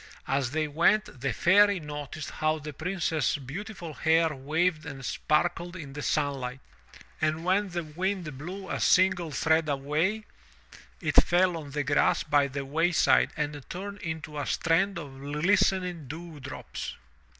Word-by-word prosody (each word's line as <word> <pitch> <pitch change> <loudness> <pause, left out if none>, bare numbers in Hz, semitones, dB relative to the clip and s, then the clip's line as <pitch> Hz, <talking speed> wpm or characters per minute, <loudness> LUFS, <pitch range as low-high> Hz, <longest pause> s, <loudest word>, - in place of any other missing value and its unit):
As 135 -2 +1
they 155 +3 -1
went, 165 - +2
the 140 0 0
Fairy 200 - +5
noticed 150 0 -6
how 155 0 0
the 150 0 -7
Princess's 160 -4 0
beautiful 170 - -7
hair 160 +1 +3
waved 155 +4 0
and 140 -4 -7
sparkled 175 +5 0
in 150 -6 -8
the 145 - -5
sunlight, 135 -4 -1 0.6
and 155 +1 0
when 195 +2 +2
the 175 -1 -3
wind 170 0 -3
blew 185 +8 -7
a - - -3
single 185 -2 +3
thread 160 +2 +2
away, 155 +10 0 0.8
it - - -1
fell 180 0 +3
on 155 -3 -6
the 145 +1 -2
grass 145 +2 +2
by 145 -2 +3
the 140 0 -5
wayside 165 +5 +3
and 145 -1 -3
turned 200 +2 -6
into 160 -2 -5
a 145 - -3
strand 175 +3 +1
of 140 -5 -8
glistening 175 +2 +1
dew 160 +2 -8
drops. 135 +1 -6
160 Hz, 150 wpm, -28 LUFS, 145-180 Hz, 0.8 s, Fairy